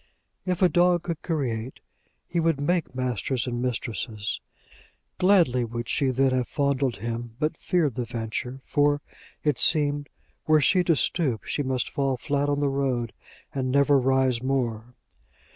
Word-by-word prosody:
If 180 0 0
a - - +8
dog 175 -1 +3
could 170 -3 -4
create, 130 -7 -3 0.5
he 170 - -1
would 165 -3 +1
make 155 -2 0
masters 125 -1 -1
and 120 -1 -3
mistresses. 110 -3 -3 0.8
Gladly 175 -10 +4
would 120 0 -5
she 135 - +1
then 130 +1 +2
have 130 -1 0
fondled 140 -3 0
him, 115 +1 -5
but 155 +1 0
feared 160 -7 0
the 125 - -2
venture; 120 +4 -4
for, 145 0 +2 0.4
it 150 -3 +1
seemed, 145 -2 +2 0.4
were 155 0 +5
she 180 +6 +4
to 165 - +4
stoop, 140 -6 0
she - - -2
must 130 -2 -1
fall 135 -2 0
flat 145 +3 -1
on 145 0 0
the 145 - +2
road, 130 -4 -1 0.4
and 130 -2 -1
never 140 +1 +4
rise 130 -2 +2
more. 125 -3 -2
135 Hz, 155 wpm, -26 LUFS, 125-150 Hz, 0.8 s, a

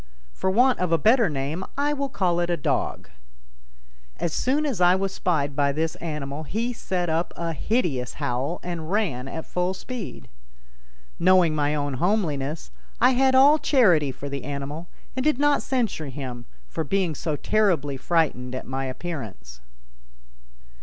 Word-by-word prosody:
For 190 - -1
want 245 +6 +4
of 180 -2 0
a 165 - +5
better 225 - +4
name 145 +5 -3
I 290 +1 +1
will 280 -1 -2
call 180 -7 +1
it 175 0 0
a 175 - +1
"dog." - - -2 1.1
As 165 - -2
soon 285 +4 +1
as 250 -11 -2
I 180 +1 +6
was 195 0 -1
spied 145 -6 0
by 140 -1 +2
this 160 +3 -1
animal 150 -3 -4
he 225 +10 -2
set 180 -6 -2
up 165 +2 0
a 170 -1 -2
hideous 150 - -1
howl 130 +7 -2
and 170 -3 -5
ran 170 - 0
at 160 +3 -5
full 180 +1 -1
speed. 240 +2 -7 0.9
Knowing 180 -2 +5
my 150 0 +1
own 145 -1 -1
homeliness, 155 - -1 0.3
I 250 +2 +6
had 260 +1 +3
all 285 +4 +7
charity 185 - +4
for 140 - -7
the 140 -2 -5
animal 145 +4 -5 0.3
and 260 - -1
did 305 -2 +2
not 290 0 +3
censure 230 - -1
him 125 -3 -6 0.2
for 160 - -3
being 185 +1 0
so 150 +1 -2
terribly 165 -7 +1
frightened 130 -4 0
at 130 - -5
my 135 +1 -3
appearance. 115 - -6
170 Hz, 160 wpm, -25 LUFS, 140-210 Hz, 1.1 s, all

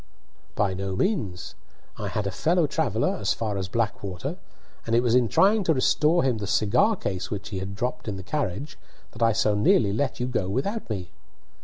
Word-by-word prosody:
"By 100 -2 +1
no 95 0 -3
means. 105 - -1 0.4
I - - -4
had 105 - -2
a 100 - -1
fellow 165 - +2
traveller 130 -7 0
as 100 0 0
far 110 -3 -2
as 95 -2 -2
Blackwater, 100 -4 -3 0.5
and 115 - +2
it 120 - +4
was 120 -2 +2
in 125 -1 +4
trying 200 - +4
to 160 - +3
restore 155 +6 +3
him 125 -4 +1
the 100 - -4
cigar 110 - +3
case 95 - -4
which 100 -2 -5
he 95 - -4
had 95 +1 -5
dropped 125 +2 -3
in 100 -2 -3
the 95 - -7
carriage 140 - -3 0.3
that 115 - -12
I 115 0 +5
so 105 -1 +2
nearly 105 0 +3
let 130 +5 -1
you 125 - 0
go 125 -6 -1
on 95 - -3
without 200 - -2
me." 95 -5 -4
110 Hz, 205 wpm, -25 LUFS, 100-135 Hz, 0.5 s, I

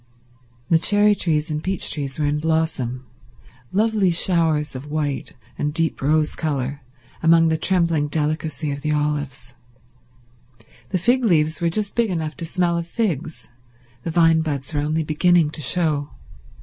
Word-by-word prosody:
The 165 - +5
cherry 205 +3 +4
trees 160 -5 -1
and 150 0 -3
peach 190 -1 0
trees 140 -3 -4
were 150 - 0
in 145 +1 0
blossom—lovely 135 - -2
showers 165 -4 +1
of 135 +3 -8
white 145 -2 -2 0.3
and 150 0 0
deep 165 -1 0
rose 155 +2 +2
colour 140 -2 -3 0.4
among 165 0 +5
the 160 - +2
trembling 170 -3 +2
delicacy 155 0 -2
of 140 0 -5
the 150 +1 0
olives; 145 -4 -2 1.4
the 190 - 0
fig 245 +8 +2
leaves 160 -7 +2
were 170 - +2
just 205 +4 -2
big 235 -2 +1
enough 160 -4 -3
to 170 - -5
smell 170 0 0
of 170 - -5
figs, 165 - -3 0.5
the 165 - -4
vine 165 -1 +4
buds 145 -2 -3
were 145 - 0
only 155 +2 0
beginning 155 +1 +3
to 155 - -6
show. 150 -1 0
155 Hz, 150 wpm, -22 LUFS, 145-170 Hz, 1.4 s, The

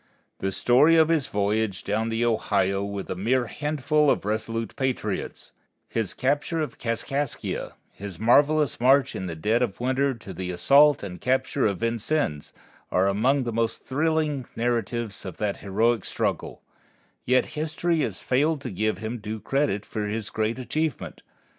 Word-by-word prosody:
The 95 - -1
story 130 - +4
of 160 -1 +5
his 160 -5 +2
voyage 105 0 -1
down 110 +2 -1
the 115 +1 0
Ohio 100 -4 +1
with 100 -1 -5
a - - -2
mere 120 +7 +1
handful 150 +4 +1
of - - +1
resolute 110 +1 -2
patriots, 130 -2 -3 0.4
his 110 -4 -3
capture 145 +5 0
of 155 - -4
Kaskaskia, 120 +4 -2 0.2
his 100 -3 -8
marvelous 145 +5 +3
march 135 +2 +4
in 95 - -4
the 85 - -5
dead 110 +9 +1
of 115 -6 -1
winter 130 +2 +1
to 110 -4 -10
the 95 -1 -5
assault 140 +11 +5
and 90 -3 -7
capture 130 0 +1
of 100 -1 -3
Vincennes, 115 - -1 0.4
are 90 +1 +3
among 125 +8 +2
the 120 -2 -3
most 115 0 -1
thrilling 150 -2 0
narratives 115 -2 -2
of 95 -4 -7
that 105 -2 -1
heroic 110 +2 +1
struggle; - - -3 0.6
yet 130 +1 +3
history 160 +2 -1
has 110 -10 -2
failed 150 +4 +2
to 125 - -5
give 105 +1 -1
him 110 +3 -5
due 110 +1 -5
credit 115 -2 0
for 105 -1 -3
his 105 0 -3
great 110 +2 -1
achievement. 155 +3 -3
115 Hz, 160 wpm, -25 LUFS, 105-140 Hz, 0.6 s, of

